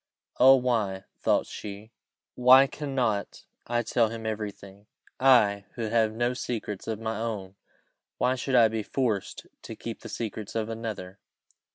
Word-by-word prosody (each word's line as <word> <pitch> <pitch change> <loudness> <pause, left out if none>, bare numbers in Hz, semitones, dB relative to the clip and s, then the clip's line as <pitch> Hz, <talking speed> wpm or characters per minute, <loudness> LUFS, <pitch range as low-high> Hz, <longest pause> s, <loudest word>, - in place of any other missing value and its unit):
"Oh! 130 +2 +9
why," 110 -7 0 0.2
thought - - +2
she, 105 +2 -9 0.4
"why 130 +2 +7
cannot 130 -7 -2 0.2
I 120 0 0
tell 115 0 +2
him 115 0 -7
every 110 -1 -2
thing? 100 +1 -16 0.3
I, 110 -7 +4
who 115 -3 -3
have 110 -1 +2
no 120 +2 0
secrets 110 -5 -5
of 110 -2 -3
my 110 -1 -3
own 105 -5 -4 0.6
why 125 +1 +2
should 130 +1 -2
I 115 -2 +7
be 110 0 -2
forced 110 -3 -2 0.2
to - - -8
keep - - -7
the - - -9
secrets 110 -2 -5
of 110 -1 -1
another?" 110 -4 -6
110 Hz, 155 wpm, -27 LUFS, 105-125 Hz, 0.6 s, Oh